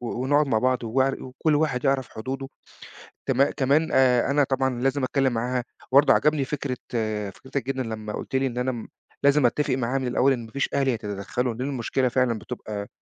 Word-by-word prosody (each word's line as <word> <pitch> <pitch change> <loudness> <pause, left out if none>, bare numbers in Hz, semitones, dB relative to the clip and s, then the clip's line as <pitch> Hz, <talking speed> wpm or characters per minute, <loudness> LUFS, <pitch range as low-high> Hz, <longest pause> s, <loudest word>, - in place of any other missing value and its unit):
و 120 - -6 0.2
ونقعُد 145 +3 +3
مع 115 -5 +2
بعض 125 +1 +1
وعر 130 +4 0
وكل 130 +4 -1
واحد 145 -4 0
يعرف 135 -2 +1
حدوده. 135 +4 -5 0.8
تم 135 +1 +3
كمان 140 +3 +1
آآ 125 -1 +4
أنا 145 +1 +4
طبعًا 130 -2 0
لازم 135 +1 +1
أتكلِّم 135 0 +1
معاها 125 +2 -1 0.3
وبرضه 140 +3 +6
عجبني 150 -3 +2
فكرة 135 -2 -3 0.5
فكرتك 130 +4 -5
جدًا 130 -1 -1
لمّا 110 -2 -5
قُلت 135 - -5
لي 135 0 +2
إن 125 - -6
أنا 125 +1 0
م 120 -3 -7 0.4
لازم 140 -1 +5
أتّفق 140 +3 +1
معاها 130 +1 0
من 130 - -2
الأول 125 +2 +3
إن 120 -3 -5
ما 110 - -14
فيش 140 - -1
أهل 140 -1 +1
يتدخَّلوا، 110 +1 -2
لإن 125 +5 -3
المشكلة 130 0 0
فعلًا 125 -2 +1
بتبقى 105 -3 -6
130 Hz, 195 wpm, -25 LUFS, 120-135 Hz, 0.8 s, وبرضه